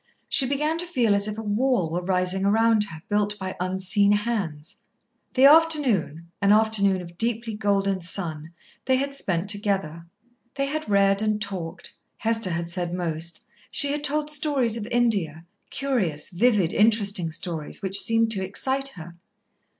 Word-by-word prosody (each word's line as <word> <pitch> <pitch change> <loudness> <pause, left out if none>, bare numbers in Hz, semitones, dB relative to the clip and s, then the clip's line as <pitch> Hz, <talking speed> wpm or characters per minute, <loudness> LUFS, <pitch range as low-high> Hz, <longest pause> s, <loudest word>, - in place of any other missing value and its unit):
She 265 - +2
began 300 +4 -1
to 350 - -3
feel 240 -11 +2
as 200 +1 +2
if 210 0 -4
a 225 - -5
wall 210 -4 +1
were 175 +2 -1
rising 185 +1 0
around 220 +1 +3
her, 160 -4 -11
built 205 0 0
by 190 -2 -5
unseen 190 +2 +1
hands. 200 -8 -3 0.6
The 260 +1 +6
afternoon, 275 - +3
an 200 0 +4
afternoon 205 -3 +3
of 170 0 -13
deeply 230 0 -1
golden 195 -2 0
sun, 165 -3 -3 0.3
they 260 - +3
had 275 +2 -1
spent 185 -8 -2
together. 195 -5 -2 0.5
They 275 0 0
had 310 -2 -4
read 200 0 +3
and 215 -1 0
talked. 190 -5 -5 0.2
Hester 225 -3 0
had 170 -1 -2
said 175 0 -3
most. 170 -1 -3 0.3
She 285 -2 +3
had 295 0 -3
told 300 +1 0
stories 280 -6 +1
of 220 -2 -5
India, 195 -10 0 0.2
curious, 205 - -2
vivid, 200 -2 +2
interesting 205 -6 +2
stories, 160 +1 -4
which 195 +1 0
seemed 225 -1 +1
to 195 -3 0
excite 265 +8 -1
her. 170 +1 -10
205 Hz, 160 wpm, -24 LUFS, 180-235 Hz, 0.6 s, The